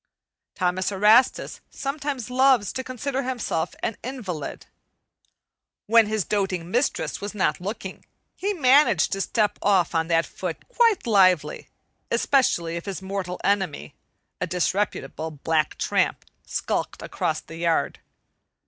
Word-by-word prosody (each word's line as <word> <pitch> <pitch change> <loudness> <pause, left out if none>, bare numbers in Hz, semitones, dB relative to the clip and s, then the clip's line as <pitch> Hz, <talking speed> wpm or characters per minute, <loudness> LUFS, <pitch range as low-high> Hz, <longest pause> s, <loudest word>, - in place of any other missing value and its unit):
Thomas 185 +1 0
Erastus 215 +6 +3
sometimes 275 -3 -4
loves 255 -5 +3
to 260 - -3
consider 260 +2 -3
himself 245 -11 -2
an 220 - -2
invalid. 205 - -5 1.2
When 225 0 +5
his 215 -4 -1
doting 190 -4 -1
mistress 245 +4 0
was 205 +1 -5
not 175 -5 0
looking, 195 0 -6 0.3
he 400 +2 -1
managed 265 - +4
to 195 - -1
step 210 0 0
off 190 -5 +2
on 165 -1 +1
that 165 -1 +2
foot 180 -3 -6
quite 465 - +3
lively, 185 -7 +3 0.4
especially 170 -11 +1
if 170 - -7
his 195 -1 -5
mortal 190 -2 -4
enemy, 190 - -1 0.5
a 180 - -1
disreputable 180 -4 -1
black 155 +1 -1
tramp, - - 0 0.2
skulked - - -3
across - - -2
the 165 - -11
yard. 165 -4 0
200 Hz, 125 wpm, -24 LUFS, 175-250 Hz, 1.2 s, When